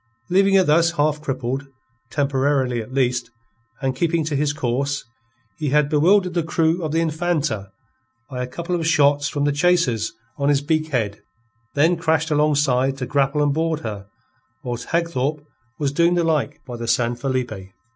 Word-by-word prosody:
Leaving 195 +1 +4
her 190 - +6
thus 170 +1 +3
half 150 -1 +1
crippled, 135 -1 -3 0.4
temporarily, 135 -3 0
at 110 - -10
least, 125 -3 0 0.5
and 130 -1 0
keeping 165 +2 0
to 150 -1 -2
his 145 +1 +1
course, 140 0 -2 0.5
he 150 -2 -1
had 145 +1 +3
bewildered 180 +5 +3
the 170 - +1
crew 165 +1 +1
of 155 - -2
the 165 - +1
Infanta 155 - -1 0.6
by 125 -2 -5
a 125 - -3
couple 170 +7 -5
of 165 -2 -1
shots 145 -2 +3
from 145 - -2
the 145 - +2
chasers 145 -8 +1 0.3
on 140 0 +2
his 140 -1 +3
beak 155 +1 0
head, 110 -8 -2 0.5
then 165 +5 +3
crashed 160 -1 0
alongside 140 -3 +2
to 130 - -3
grapple 140 +2 +1
and 145 -1 +2
board 160 0 -1
her, 100 -6 -6 0.6
whilst 120 -1 -5
Hagthorpe 155 -3 -1 0.3
was 145 -2 -1
doing 170 +4 +3
the 175 - +2
like 160 -3 -1
by 120 -2 -7
the 115 0 -5
San 120 0 +2
Felipe. 120 -7 -3
145 Hz, 170 wpm, -22 LUFS, 130-160 Hz, 0.6 s, her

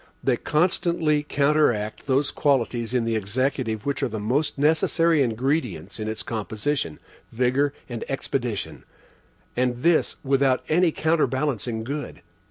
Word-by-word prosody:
They - - +3
constantly 160 -1 +1
counteract 140 -8 +1
those 140 +1 +2
qualities 120 -4 +1
in 125 -2 +1
the 115 0 0
Executive 110 +1 -1
which 140 0 -1
are - - +2
the 110 -2 -5
most 130 +10 0
necessary 160 +2 +3
ingredients 120 - -1
in 110 - -3
its 110 0 -4
composition 110 - -2 0.3
vigor 130 +4 +1 0.2
and 120 -2 -5
expedition, 125 -5 -3 0.7
and 125 0 0
this 170 -1 +3
without 135 -1 +2
any 175 +1 +3
counterbalancing 135 -8 0
good. 140 +5 -5
130 Hz, 125 wpm, -24 LUFS, 115-150 Hz, 0.7 s, They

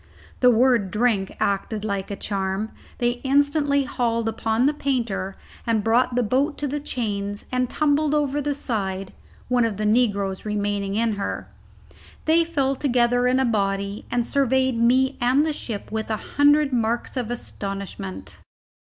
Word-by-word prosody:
The 250 - +6
word 240 -4 +3
"drink" 210 -2 0
acted 205 +2 -1
like 200 -2 -2
a 200 - -3
charm; 195 +1 -2 0.3
they 240 0 0
instantly 285 +1 +2
hauled 230 -3 -1
upon 225 +2 0
the 290 - +3
painter 235 -9 -2 0.3
and 225 -2 +1
brought 235 +2 +2
the 245 - +2
boat 270 +7 +1
to 290 - -1
the 290 +2 -2
chains 205 -7 -3
and 255 -1 0
tumbled 300 0 +2
over 290 -1 +1
the 290 0 -1
side, 195 -8 -3 0.3
one 250 -1 +2
of 225 -4 -1
the 215 - -2
negroes 205 -4 +1
remaining 205 -1 -1
in 225 -1 +1
her. 200 - -4 0.8
They 325 +2 +4
fell 280 -5 0
together 245 -2 +2
in 255 +1 +3
a 265 - +3
body, 200 -2 -1
and 240 -1 0
surveyed 260 -2 +1
me 260 +3 +3
and 255 +5 +3
the 315 - 0
ship 220 -9 -6
with 220 0 -3
a 220 - 0
hundred 290 +3 +3
marks 235 +1 0
of 245 -3 -2
astonishment. 195 -4 -6
235 Hz, 160 wpm, -23 LUFS, 205-265 Hz, 0.8 s, The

